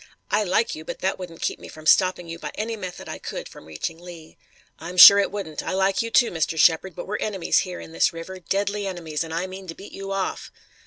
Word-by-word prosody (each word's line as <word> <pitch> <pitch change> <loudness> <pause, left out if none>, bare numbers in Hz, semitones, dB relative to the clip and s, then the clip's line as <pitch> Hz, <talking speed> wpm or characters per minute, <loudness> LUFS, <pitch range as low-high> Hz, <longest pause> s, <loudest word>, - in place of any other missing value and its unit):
I 210 +1 +3
like 205 +4 +1
you, 155 - -7
but - - -6
that 190 0 -1
wouldn't 175 -3 -8
keep - - -2
me - - -11
from 155 0 -12
stopping 185 +1 +3
you 165 0 -7
by - - -6
any 225 +2 -3
method 185 -4 -8
I - - -6
could - - -6
from - - -14
reaching 80 - -5
Lee." 170 -2 -12 0.4
"I'm 175 +2 -8
sure 200 +2 +11
it 200 - +2
wouldn't. 190 -7 -5
I - - -4
like 190 +1 +2
you, 230 - -3
too, 235 +1 +4
Mr. 160 -1 -1
Shepard, 165 +2 +3
but - - -6
we're 210 +2 -3
enemies 195 -5 0
here 180 -1 -4
in - - -10
this - - +2
river, 170 +3 -8
deadly 200 +2 -2
enemies, 165 -4 -4
and 165 - -9
I 170 +3 -2
mean 190 0 -9
to 165 - -7
beat 200 - -12
you 195 0 -6
off." 195 -1 -3
185 Hz, 250 wpm, -24 LUFS, 165-195 Hz, 0.4 s, sure